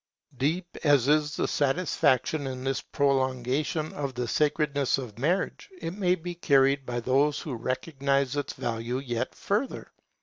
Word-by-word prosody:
Deep 170 +6 -1
as 145 -5 +4
is 150 0 +3
the - - 0
satisfaction 145 -1 +1
in 130 -1 -5
this 135 0 -1
prolongation 135 +3 0
of 140 -3 -4
the 125 0 -2
sacredness 145 0 +1
of 120 -5 -7
marriage, 175 - -1
it 165 - -4
may 185 -2 +2
be 175 0 -6
carried 140 -4 +3
by 120 -1 -2
those 135 +5 +2
who 145 - -5
recognize 135 +2 -1
its 145 - -2
value 115 +1 -3
yet 120 -3 -3
further. 215 +7 -2
140 Hz, 145 wpm, -27 LUFS, 130-155 Hz, -, as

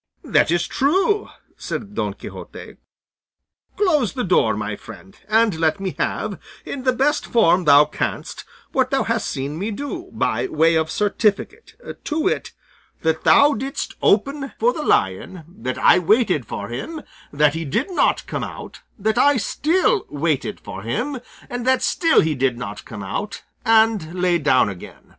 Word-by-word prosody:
"That - - +2
is 170 +1 +1
true," 385 - +1 0.3
said - - -5
Don - - -2
Quixote; - - -10 1.0
"close 305 - +2
the 255 -3 -2
door, 115 - +2
my 105 -1 -3
friend, 95 -4 -13
and 220 -1 +3
let 160 +4 +1
me 195 -1 -3
have, - - -2 0.3
in 265 -2 -6
the 255 - +4
best 270 +4 0
form 185 -6 +3
thou 145 0 +7
canst, - - -4 0.3
what - - +1
thou - - +1
hast - - -1
seen 140 +4 -4
me 205 +4 -2
do, 290 - -6
by - - -1
way 165 - +3
of 160 0 +1
certificate; 210 - -1 0.3
to 310 +1 -2
wit, 315 - -1 0.5
that 160 0 0
thou 285 +1 +6
didst 270 +5 -4
open 275 +7 +1
for 485 +2 +2
the - - -4
lion, 160 - 0
that 130 -7 -5
I - - +5
waited 180 - +2
for 100 - -5
him, 300 - -6 0.3
that 145 0 +3
he 165 +1 -3
did 215 - -2
not 360 - +1
come - - -4
out, - - -8 0.2
that 220 +3 0
I 285 0 +5
still 370 - +1
waited 150 -1 -2
for 95 - -8
him, 245 - -3 0.3
and 245 0 -5
that 260 0 +3
still 330 -2 +3
he 155 -1 0
did 130 -3 0
not 105 -4 -7
come 105 -3 -8
out, 200 - -5 0.2
and 220 -7 +3
lay 175 -1 +2
down 135 -6 +3
again. 95 -3 -10
200 Hz, 165 wpm, -21 LUFS, -, 1.0 s, thou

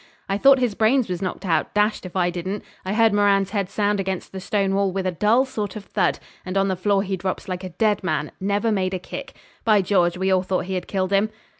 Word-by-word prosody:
I 195 +1 -1
thought 275 +2 +7
his 245 -4 0
brains 225 +4 +2
was 180 -1 -3
knocked 190 +1 -4
out, 165 0 0
dashed 210 -2 +1
if 180 - -14
I 175 -1 +2
didn't. 185 +4 -4 0.2
I 190 - -2
heard 225 -1 +4
Moran's 200 -1 +3
head 200 -3 -1
sound 205 -1 0
against 190 -1 -3
the 190 - -6
stone 195 0 0
wall 195 -1 +1
with 190 0 -3
a 185 - +1
dull 215 +9 +3
sort 210 -7 -4
of 210 -2 -7
thud; - - 0 0.3
and 185 +1 -3
on 195 0 +2
the 190 - 0
floor 195 +2 +1
he 195 -1 -2
drops 185 0 -4
like 185 0 -4
a 185 - -5
dead 210 +4 0
man 185 - -1
never 205 +3 0
made 190 -2 0
a - - -3
kick. 270 +9 -8 0.3
By 210 -3 +4
George! 180 -2 +2
we 190 +1 0
all 185 -1 +4
thought 185 -1 -1
he 190 - -4
had 185 - -3
killed 190 0 -1
him. 200 +2 +3
195 Hz, 255 wpm, -23 LUFS, 185-210 Hz, 0.3 s, thought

